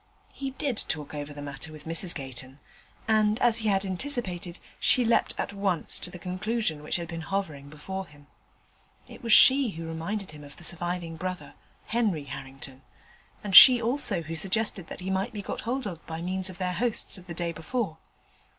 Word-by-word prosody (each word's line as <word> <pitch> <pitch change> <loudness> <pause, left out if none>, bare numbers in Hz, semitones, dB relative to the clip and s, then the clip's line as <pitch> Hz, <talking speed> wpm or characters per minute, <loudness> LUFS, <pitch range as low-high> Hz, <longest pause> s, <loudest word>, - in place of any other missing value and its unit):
He 275 -1 -5
did 265 -2 -3
talk 150 -2 -4
over 145 0 -5
the 145 0 -8
matter 145 +2 -6
with 155 -1 -12
Mrs 165 +2 +2
Gayton, 130 0 -8 0.5
and, 215 0 +2
as 235 -2 +4
he 220 -1 -3
had 195 0 +1
anticipated, 185 -4 -2 0.2
she 250 - +3
leapt 230 - +1
at - - -3
once 195 -4 0
to - - 0
the 180 - -9
conclusion 185 -1 -3
which 150 - -2
had 170 -1 -2
been 165 0 -6
hovering 160 -6 -4
before 190 +6 -7
him. 145 -1 -19 0.8
It - - -13
was 230 -2 -3
she 265 +3 +7
who 165 +1 -7
reminded 165 +5 -5
him 150 -1 -12
of 145 0 -10
the - - -12
surviving 175 -1 0
brother, 185 +1 -5 0.3
Henry 215 -10 -1
Harrington, 135 -1 -9 0.6
and 200 -3 -2
she 250 +4 +11
also 230 - +3
who 160 +1 -6
suggested 190 +1 0
that - - -8
he 190 +1 -4
might 190 +1 -2
be 205 -2 -6
got - - -5
hold 255 +3 -3
of 175 -5 -6
by 160 0 -5
means 185 +2 -2
of 185 - -10
their 180 -1 -2
hosts 225 -2 +1
of 180 - -17
the 170 - -6
day 170 0 -2
before. 165 0 -4
180 Hz, 195 wpm, -27 LUFS, 160-210 Hz, 0.8 s, she